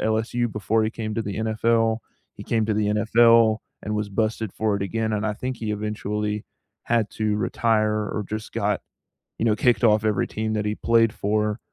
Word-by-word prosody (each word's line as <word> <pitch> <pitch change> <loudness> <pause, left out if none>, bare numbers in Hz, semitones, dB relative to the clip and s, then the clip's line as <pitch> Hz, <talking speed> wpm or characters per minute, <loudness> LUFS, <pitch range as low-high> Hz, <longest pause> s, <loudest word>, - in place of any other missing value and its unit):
LSU 110 +2 0
before 105 +2 +1
he 110 - 0
came 110 -2 -4
to 115 - -1
the 100 -2 -5
NFL. 110 +1 +1 0.4
He - - -9
came 110 -2 0
to 110 - 0
the 105 0 +1
NFL 115 +1 +5 0.3
and 105 - -2
was 105 -1 -2
busted 110 0 -1
for 110 -2 0
it 100 - -3
again, 110 +2 -1
and 105 0 -1
I 105 -1 -1
think 125 +2 -4
he 110 -2 -3
eventually 105 0 -3 0.4
had 115 -3 +1
to 105 -1 -1
retire 110 0 +1 0.2
or 105 - -3
just 110 0 -5
got, - - 0 0.6
you - - -2
know, 110 - +4
kicked 120 +3 +2
off 110 -1 +4
every 105 -2 +1
team 110 0 -3
that 105 -1 0
he 105 0 -1
played 115 -1 +3
for 105 +1 -1
110 Hz, 200 wpm, -24 LUFS, 105-115 Hz, 0.6 s, NFL